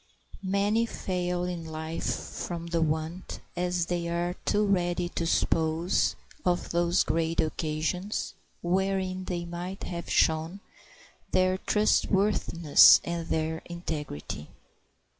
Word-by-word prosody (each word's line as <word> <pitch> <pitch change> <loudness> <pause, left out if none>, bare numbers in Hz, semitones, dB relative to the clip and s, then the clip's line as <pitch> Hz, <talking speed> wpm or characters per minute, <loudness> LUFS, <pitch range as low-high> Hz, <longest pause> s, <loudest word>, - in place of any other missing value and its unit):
Many 200 +4 +1
fail 180 -4 -2
in 180 -2 -3
life 160 0 -5
from 170 -1 -5
the 170 -1 -1
want, 160 +3 -2 0.2
as 180 -1 0
they 170 -1 -2
are 170 +1 -1
too 210 +1 +2
ready 175 -3 +1
to 170 -1 -2
suppose, 165 +2 +1 0.3
of 175 -1 0
those 170 +1 +3
great 165 0 -1
occasions 160 +7 -1 0.3
wherein 185 +1 0
they 175 -2 -3
might 175 +3 -6
have 170 -1 -5
shown 160 +4 +2 0.7
their 185 0 +2
trustworthiness 195 -6 +5
and 170 -1 -3
their 160 0 -1
integrity. 150 - -5
175 Hz, 110 wpm, -28 LUFS, 165-185 Hz, 0.7 s, trustworthiness